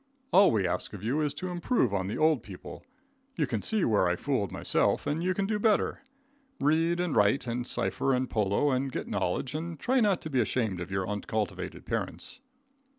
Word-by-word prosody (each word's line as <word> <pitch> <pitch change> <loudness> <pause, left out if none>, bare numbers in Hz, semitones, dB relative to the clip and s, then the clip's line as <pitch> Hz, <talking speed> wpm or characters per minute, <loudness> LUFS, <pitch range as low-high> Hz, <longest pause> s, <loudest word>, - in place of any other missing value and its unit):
All 195 +1 +7
we 105 -4 +1
ask 90 - -2
of 100 -2 -8
you 130 +8 0
is 150 -1 -1
to 185 +4 -4
improve 175 - +1
on 95 -1 -1
the 100 - -3
old 155 -5 +3
people. 95 -4 -10 0.5
You - - +1
can - - -2
see 220 -4 +1
where 105 -5 +3
I 90 - +1
fooled 115 - -1
myself, - - +1
and 150 +3 -1
you 185 0 +1
can 200 - 0
do 210 +1 -1
better. 215 +3 +1 0.6
Read 165 +3 +2
and 175 -4 -1
write, 105 +7 +3
and 120 +1 -3
sifer, 135 - 0
and 130 +1 0
polo, 105 +6 +1
and 130 +1 0
get - - -4
nolledge, 130 - -1
and 160 0 -5
try 260 - +2
not 205 -6 +3
to 155 - -6
be 130 -2 +3
ashamed 110 -5 -1
of 85 - -5
your 95 -1 -2
uncultivated 105 -1 -3
parents. 255 - -4
135 Hz, 205 wpm, -29 LUFS, 105-170 Hz, 0.6 s, All